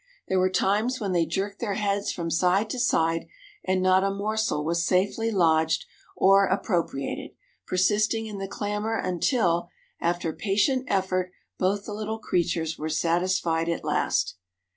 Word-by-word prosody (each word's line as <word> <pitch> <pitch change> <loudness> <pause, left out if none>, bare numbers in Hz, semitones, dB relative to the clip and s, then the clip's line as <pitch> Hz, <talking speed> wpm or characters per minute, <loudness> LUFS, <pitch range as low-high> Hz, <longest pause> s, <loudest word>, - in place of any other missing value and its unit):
There 190 - +2
were 185 0 +3
times 210 +7 +1
when 200 -4 -2
they 170 -2 +2
jerked 195 +1 -3
their 205 -4 -2
heads 200 -1 0
from 170 -2 -4
side 185 +5 +2
to 255 - -3
side 165 -8 +1 0.4
and 185 0 0
not 185 0 +4
a 195 - +2
morsel 205 -5 -1
was 170 +1 0
safely 200 +6 +1
lodged 160 -5 +2 0.3
or 195 0 +5
appropriated, 175 -8 -2 0.3
persisting 210 +4 +1
in 210 -2 -6
the 195 - -4
clamor 210 +3 -2
until, 175 -2 +1 0.3
after 170 -1 -1
patient 215 - +1
effort, 185 -3 0 0.3
both 195 +2 0
little 215 +1 -4
creatures 165 -5 -1
were 155 +1 -3
satisfied 170 0 +1
at 170 - -2
last. - - 0
190 Hz, 145 wpm, -26 LUFS, 170-210 Hz, 0.4 s, or